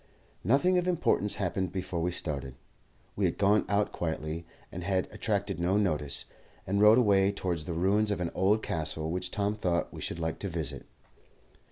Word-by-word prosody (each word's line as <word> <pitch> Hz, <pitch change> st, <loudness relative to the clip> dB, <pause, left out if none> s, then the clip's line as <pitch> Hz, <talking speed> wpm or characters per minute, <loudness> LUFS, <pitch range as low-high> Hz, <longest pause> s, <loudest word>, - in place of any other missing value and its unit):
Nothing 145 Hz, -, +3 dB
of 180 Hz, -, -2 dB
importance 155 Hz, -, +2 dB
happened 95 Hz, -1 st, -1 dB
before 90 Hz, -2 st, -3 dB
we 90 Hz, -, +1 dB
started. 70 Hz, -6 st, -4 dB, 0.6 s
We -, -, +1 dB
had -, -, 0 dB
gone 105 Hz, +2 st, +3 dB
out 100 Hz, +1 st, +1 dB
quietly, 80 Hz, 0 st, -3 dB, 0.2 s
and 90 Hz, -, -6 dB
had 95 Hz, 0 st, 0 dB
attracted 100 Hz, -3 st, -2 dB
no 90 Hz, +4 st, +2 dB
notice, 75 Hz, -8 st, 0 dB, 0.4 s
and 100 Hz, +2 st, 0 dB
rode 105 Hz, +2 st, +8 dB
away 100 Hz, -5 st, +4 dB
towards 90 Hz, -5 st, -3 dB
the 85 Hz, -, -3 dB
ruins 100 Hz, +5 st, +2 dB
of 100 Hz, -, -1 dB
an 85 Hz, -2 st, -2 dB
old 105 Hz, +4 st, +2 dB
castle 80 Hz, 0 st, -2 dB
which 90 Hz, +1 st, -2 dB
Tom 100 Hz, +1 st, 0 dB
thought 90 Hz, -5 st, -1 dB
we -, -, -8 dB
should -, -, -3 dB
like 80 Hz, -1 st, -2 dB
to 100 Hz, -, -3 dB
visit. 80 Hz, -5 st, -4 dB
95 Hz, 180 wpm, -29 LUFS, 85-105 Hz, 0.6 s, rode